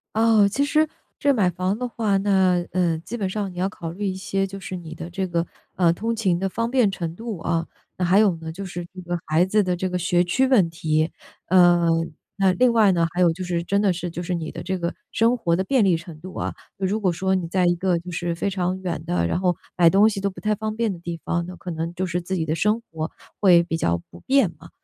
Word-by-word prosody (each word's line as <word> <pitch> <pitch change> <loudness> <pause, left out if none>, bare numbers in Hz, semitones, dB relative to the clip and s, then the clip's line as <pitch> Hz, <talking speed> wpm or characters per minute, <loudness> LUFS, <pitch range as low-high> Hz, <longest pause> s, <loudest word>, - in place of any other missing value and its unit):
哦， 220 -2 +5
其 265 +8 0
实 310 +2 +2 0.3
这 280 -1 +3
买 195 -7 +3
房 185 +4 -1
的 250 - -3
话， 215 -4 0
那， 190 -2 +3
嗯， 170 -3 +1
基 240 - -5
本 195 -3 -1
上 200 -2 -3
你 - - -13
要 190 - +1
考 170 -5 -6
虑 200 +4 -4
一 185 - -2
些， 195 +1 -1
就 195 +1 -8
是 185 0 -5
你 165 -2 -9
的 170 +1 -7
这 190 +2 -2
个， 170 0 0 0.3
呃， 175 -2 +4
通 225 +6 -2
勤 185 -6 +1
的 195 - 0
方 230 +5 -2
便 250 -6 +4
程 170 -4 -4
度 225 -6 -5
啊， 165 0 -1 0.3
那 180 - 0
还 190 +4 +5
有 205 -4 +4
呢 160 0 -7
就 180 +5 -6
是 175 -2 -6
这 185 - -8
个 175 0 -3
孩 160 +3 +3
子 205 +3 +2
的 180 -2 0
这 185 +1 -2
个 180 0 -2
学 175 0 +2
区 260 +10 +2
问 215 -10 +4
题。 155 0 0 0.4
嗯， 175 -3 +4 0.2
那 195 -2 +3
另 250 +5 +4
外 215 -5 +5
呢， 170 -1 +2
还 175 - -3
有 175 -2 +5
就 185 +2 -6
是 175 -1 -1
真 200 +4 0
的 200 - +3
是 175 0 -3
就 175 +1 -5
是 180 - -2
你 160 -2 -4
的 - - -6
这 190 0 -2
个 170 0 -2 0.2
生 230 +2 +3
活 170 -8 0
的 190 - -1
便 260 -3 +3
利 180 -4 +3
程 165 -1 -10
度 185 +1 -9
啊。 - - -2 0.2
那 190 -1 -1
如 215 +3 -1
果 185 -3 +2
说 190 +3 0
你 180 -2 -1
在 185 0 +2
一 175 - +3
个 175 -1 +1
就 180 +1 -10
是 170 0 -2
非 185 +4 -1
常 185 -1 -1
远 175 -3 -3
的， 85 -1 0
然 - - 0
后 180 -1 +3 0.2
买 170 -2 +6
东 205 +5 +5
西 200 -2 -4
都 200 - +1
不 190 - -11
太 215 0 0
方 215 +1 -3
便 225 -4 0
的 - - -8
地 170 -1 -6
方， 170 0 0
那 180 0 -9
可 180 - -6
能 165 +1 -3
就 185 +1 -2
是 175 0 -2
自 190 +2 -3
己 160 - -1
的 155 +1 -1
生 210 +7 +1
活 160 0 -4 0.3
会 175 -4 +6
比 170 -1 -3
较 85 - 0
不 - - -14
便 265 -8 +3
嘛。 - - -14
185 Hz, 290 characters per minute, -23 LUFS, 170-200 Hz, 0.4 s, 买